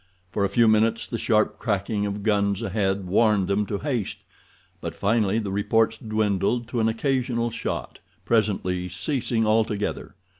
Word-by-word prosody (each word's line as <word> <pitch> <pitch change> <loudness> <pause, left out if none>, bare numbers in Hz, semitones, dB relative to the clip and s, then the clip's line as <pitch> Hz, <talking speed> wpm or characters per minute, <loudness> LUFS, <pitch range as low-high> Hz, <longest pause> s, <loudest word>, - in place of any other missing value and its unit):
For 100 - 0
a 100 - +2
few 115 +1 +4
minutes, 110 +1 +3
the 115 - -4
sharp 110 -1 +1
cracking 105 -1 -1
of 100 0 -4
guns 100 -1 +1
ahead 95 -2 -1
warned 100 0 +3
them 100 +1 0
to 100 - -2
haste, 125 -6 -2 0.6
but - - -5
finally 105 0 +1
the 105 -4 -2
reports 110 +2 +1
dwindled 110 +1 0
to 120 - -2
an 110 0 +3
occasional 120 -1 0
shot, - - -4 0.3
presently 95 -5 0
ceasing 115 - -1
altogether. 110 -4 0
110 Hz, 150 wpm, -25 LUFS, 100-115 Hz, 0.6 s, few